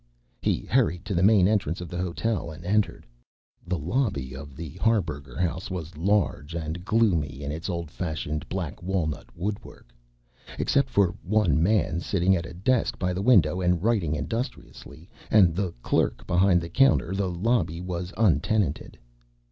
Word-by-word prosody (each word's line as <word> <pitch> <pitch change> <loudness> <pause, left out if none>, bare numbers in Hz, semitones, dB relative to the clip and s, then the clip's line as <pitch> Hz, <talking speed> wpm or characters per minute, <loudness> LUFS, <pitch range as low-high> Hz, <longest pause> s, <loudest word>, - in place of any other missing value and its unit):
He - - 0
hurried 90 +3 +1
to 105 - -3
the 85 - +1
main 100 -2 +5
entrance 100 -5 0
of 90 - -6
the 90 +2 -5
hotel, 90 +1 -2
and 80 +2 -10
entered. 105 +2 0 0.6
The 90 0 -1
lobby 80 - -1
of 70 0 -9
the 80 -1 -7
Harburger 75 - 0
House 90 +1 -1
was 85 -3 -6
large, 85 -3 0
and 80 +1 -4
gloomy 90 -11 +1
in 70 - -3
its 80 +5 -5
old 85 -4 -4
fashioned 80 -2 -4
black 85 -5 -4
walnut 90 -5 -2
woodwork. 95 -9 -6 0.6
Except 140 -1 +1
for 100 -6 +2
one 105 -3 +2
man 90 -2 +2
sitting 95 +1 +2
at 85 -1 -3
a - - -10
desk 120 +7 +1
by 90 -1 -1
the 90 - -2
window 95 - +4
and 90 -1 +1
writing 100 -10 +1
industriously, 85 - -6 0.2
and 95 -6 +5
the 95 -1 -1
clerk - - 0
behind 90 0 +3
the 85 - -6
counter, 135 -4 +3
the 95 -1 -1
lobby 90 -2 0
was 90 0 -4
untenanted. 105 -5 +1
90 Hz, 160 wpm, -26 LUFS, 80-100 Hz, 0.6 s, main